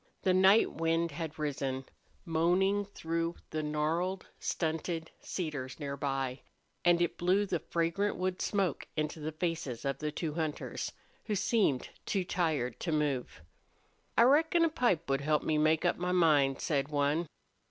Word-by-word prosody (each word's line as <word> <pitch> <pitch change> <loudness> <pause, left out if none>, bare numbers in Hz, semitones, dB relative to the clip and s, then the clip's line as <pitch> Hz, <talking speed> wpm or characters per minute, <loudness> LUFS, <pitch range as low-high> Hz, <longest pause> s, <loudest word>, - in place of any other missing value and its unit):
The 185 - +3
night 190 +4 +5
wind 165 +1 0
had 160 +1 -5
risen, 135 -3 -2 0.4
moaning 185 +5 +2
through 165 -3 -2 0.2
the 155 - -1
gnarled, 160 +5 -1
stunted 160 0 -2
cedars 150 -7 -4
near 140 -2 -3
by, 135 -2 -2 0.4
and 175 -1 +5
it 175 - -2
blew 185 +4 +3
the 175 -4 -1
fragrant 170 +6 0
wood 185 0 -2
smoke 195 -3 0
into 155 +1 -1
the 155 +1 -3
faces 155 -7 -3
of 135 0 -1
the 150 0 -2
two 155 0 -3
hunters, 155 -2 -3 0.3
who 210 - -1
seemed 195 - +1 0.2
too 195 -2 +1
tired 155 - -1
to 170 - -2
move. 145 - -1 0.7
"I 230 - +8
reckon 320 +6 +5
a - - +2
pipe 240 - +1
would 135 0 +1
help 150 +1 +1
me 155 -1 +1
make 155 +2 +3
up 175 - +2
my 180 +1 -1
mind," 150 -6 +4
said 140 -3 0
one. 150 +3 +1
165 Hz, 155 wpm, -32 LUFS, 150-180 Hz, 0.7 s, I